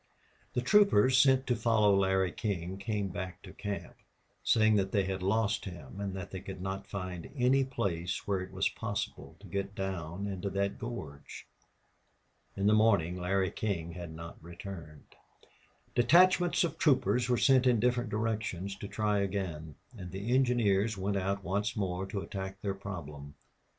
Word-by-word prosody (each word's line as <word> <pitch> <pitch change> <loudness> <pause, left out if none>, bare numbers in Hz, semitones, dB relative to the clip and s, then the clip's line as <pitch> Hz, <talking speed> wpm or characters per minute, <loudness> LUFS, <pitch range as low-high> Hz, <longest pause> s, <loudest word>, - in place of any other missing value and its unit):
The 125 - 0
troopers 130 - +5
sent 130 0 +5
to 125 - +1
follow 110 -3 +3
Larry 95 -1 +2
King 95 -1 -3
came 100 -1 -2
back 90 0 -6
to - - -11
camp, 100 -1 -5 0.5
saying 110 -1 +4
that 95 -1 0
they 100 - +2
had 95 0 -3
lost 110 +3 +1
him 90 -3 -9
and 100 -1 -3
that 95 -2 -6
they 95 - -5
could 95 0 -8
not 95 +1 -4
find 90 -3 -5
any 135 +1 +3
place 95 -10 -2
where 100 -2 +1
it 95 0 -7
was 95 +1 +1
possible 105 -2 -4
to - - -14
get 100 0 -4
down 95 -1 -4
into 100 -1 -3
that 100 +1 -1
gorge. 80 - -7 1.1
In 100 - 0
the 105 - +5
morning 100 -6 +3
Larry 95 +1 0
King 85 -6 -2
had 85 -1 -7
not 85 0 -9
returned. 85 -3 -10 0.8
Detachments 175 +7 +5
of 170 - -2
troopers 125 -4 +3
were 125 - +3
sent 130 +1 +5
in 120 -3 +4
different 120 0 +1
directions 105 -3 -2
to 100 - -6
try 105 0 0
again. 90 -7 -3 0.2
And 90 -5 -7
the 100 +6 -2
engineers 115 -5 +2
went 100 +1 -1
out 100 +1 -1
once 100 +4 -1
more 95 -2 -2
to 100 0 -3
attack 95 0 -6
their 100 -1 0
problem. 75 -8 -8
100 Hz, 165 wpm, -31 LUFS, 95-110 Hz, 1.1 s, troopers